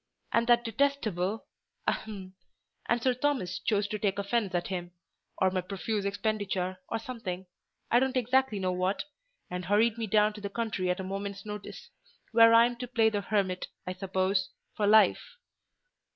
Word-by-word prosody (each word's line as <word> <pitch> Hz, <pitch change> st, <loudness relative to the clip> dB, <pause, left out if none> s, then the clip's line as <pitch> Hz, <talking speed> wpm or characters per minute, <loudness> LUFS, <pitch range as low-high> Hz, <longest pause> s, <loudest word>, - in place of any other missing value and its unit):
And 230 Hz, 0 st, +3 dB
that 240 Hz, 0 st, +5 dB
detestable—ahem—and 220 Hz, -3 st, -3 dB
Sir 255 Hz, -, +3 dB
Thomas 250 Hz, -9 st, -1 dB
chose 205 Hz, -2 st, +1 dB
to 215 Hz, -, -3 dB
take 200 Hz, -1 st, 0 dB
offence 200 Hz, -1 st, 0 dB
at 175 Hz, +2 st, -1 dB
him—or 180 Hz, +1 st, -4 dB
my 185 Hz, 0 st, 0 dB
profuse 200 Hz, +2 st, -3 dB
expenditure, 200 Hz, -3 st, -1 dB
or 225 Hz, -, -1 dB
something—I 220 Hz, -1 st, -3 dB
don't 265 Hz, 0 st, 0 dB
exactly 255 Hz, -2 st, +2 dB
know 185 Hz, -1 st, 0 dB
what—and 190 Hz, -, -4 dB
hurried 215 Hz, +4 st, +3 dB
me 225 Hz, -, -2 dB
down 210 Hz, +1 st, +3 dB
to 210 Hz, -, -10 dB
the 200 Hz, -, -4 dB
country 200 Hz, -4 st, -2 dB
at 180 Hz, +2 st, 0 dB
a -, -, -3 dB
moment's 195 Hz, +1 st, -5 dB
notice; 210 Hz, -1 st, -8 dB, 0.4 s
where 230 Hz, 0 st, +7 dB
I'm 235 Hz, +1 st, +5 dB
to 250 Hz, -, -5 dB
play 225 Hz, -2 st, +3 dB
the 205 Hz, -1 st, -1 dB
hermit, 195 Hz, -3 st, -1 dB, 0.2 s
I 185 Hz, -, -3 dB
suppose, 185 Hz, 0 st, 0 dB, 0.3 s
for 205 Hz, -, +1 dB
life." 220 Hz, -, +4 dB
205 Hz, 150 wpm, -29 LUFS, 185-230 Hz, 0.4 s, where